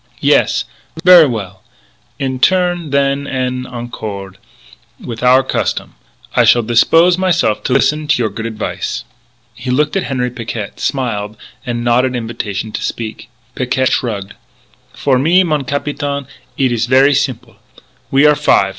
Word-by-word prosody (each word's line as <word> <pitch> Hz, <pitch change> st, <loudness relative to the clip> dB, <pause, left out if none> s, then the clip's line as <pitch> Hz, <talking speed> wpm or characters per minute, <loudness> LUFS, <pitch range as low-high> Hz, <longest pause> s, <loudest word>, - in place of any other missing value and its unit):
Yes? -, -, +2 dB, 0.4 s
Ver' 175 Hz, -4 st, +8 dB
well; 100 Hz, -6 st, -5 dB, 0.6 s
in 130 Hz, -1 st, -3 dB
turn, 175 Hz, 0 st, +2 dB
then, 140 Hz, 0 st, 0 dB
en 130 Hz, -1 st, -2 dB
accord 105 Hz, -6 st, -7 dB, 0.6 s
with 115 Hz, -1 st, -7 dB
our 130 Hz, +1 st, +5 dB
custom, -, -, -2 dB, 0.4 s
I -, -, +5 dB
shall 120 Hz, -, +4 dB
dispose 165 Hz, +10 st, +4 dB
myse'f 175 Hz, -, +1 dB
to 125 Hz, -, +1 dB
listen 150 Hz, +3 st, +1 dB
to 155 Hz, -5 st, +2 dB
your 110 Hz, -, -1 dB
good 110 Hz, +3 st, -5 dB
advice." 110 Hz, -1 st, -4 dB, 0.5 s
He 120 Hz, +3 st, -7 dB
looked 150 Hz, +6 st, +1 dB
at 195 Hz, -, 0 dB
Henri 125 Hz, -2 st, -1 dB
Picquet, 115 Hz, -4 st, -6 dB
smiled 110 Hz, -6 st, -2 dB, 0.3 s
and 120 Hz, -1 st, -2 dB
nodded 125 Hz, +2 st, +2 dB
invitation 110 Hz, -3 st, -4 dB
to -, -, -5 dB
speak. 110 Hz, 0 st, -5 dB, 0.2 s
Picquet 130 Hz, +1 st, 0 dB
shrugged: 100 Hz, -5 st, -2 dB, 0.6 s
"For 130 Hz, -3 st, +1 dB
me, 170 Hz, +7 st, +4 dB
mon 150 Hz, -5 st, -1 dB
capitaine, 140 Hz, 0 st, -3 dB, 0.3 s
eet 130 Hz, -2 st, +1 dB
ees 115 Hz, -1 st, 0 dB
ver' 135 Hz, +3 st, +5 dB
simple. 135 Hz, -4 st, -2 dB, 0.5 s
We 140 Hz, +2 st, +4 dB
are 150 Hz, -, +7 dB
five. 100 Hz, -8 st, +2 dB
125 Hz, 145 wpm, -15 LUFS, 115-145 Hz, 0.6 s, Ver